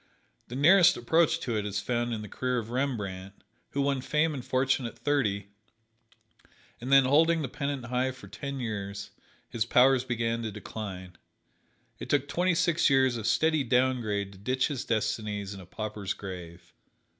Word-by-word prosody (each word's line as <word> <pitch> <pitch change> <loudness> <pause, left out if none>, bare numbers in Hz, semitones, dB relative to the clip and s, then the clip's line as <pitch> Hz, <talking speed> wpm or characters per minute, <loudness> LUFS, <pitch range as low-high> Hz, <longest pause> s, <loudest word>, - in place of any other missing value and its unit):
The 120 - -7
nearest 175 +5 +6
approach 160 +7 +2
to 120 -3 -2
it 105 - 0
is 100 -1 -2
found 120 +2 -1
in 110 -2 -3
the - - -7
career 125 +5 -2
of 115 -1 -4
Rembrandt, 100 -8 -3 0.3
who 140 - -1
won 140 -2 0
fame 150 +4 +1
and 130 -4 -5
fortune 130 0 +1
at - - -10
thirty, 105 -9 0 1.3
and 125 +3 -5
then 135 -1 +7
holding 160 +4 +4
the - - -2
pennant 140 0 -4
high 125 +2 0
for 130 -6 -10
ten 135 +8 -6
years, 100 -4 -5 0.4
his 115 - -1
powers 125 +2 +4
began 115 -2 -1
to 110 -1 -3
decline. 95 -3 -8 0.8
It - - -7
took 145 -1 +2
twenty 180 +4 +1
six 170 -2 +3
years 130 -2 +3
of 110 -2 -3
steady 155 -2 +2
down 125 +1 +2
grade 100 -3 -2
to 100 - -14
ditch 130 +5 0
his 140 -4 -4
destinies 105 -2 -2
in 100 - -9
a 90 - -12
pauper's 105 0 -4
grave. 90 -3 -9
120 Hz, 175 wpm, -28 LUFS, 105-135 Hz, 1.3 s, then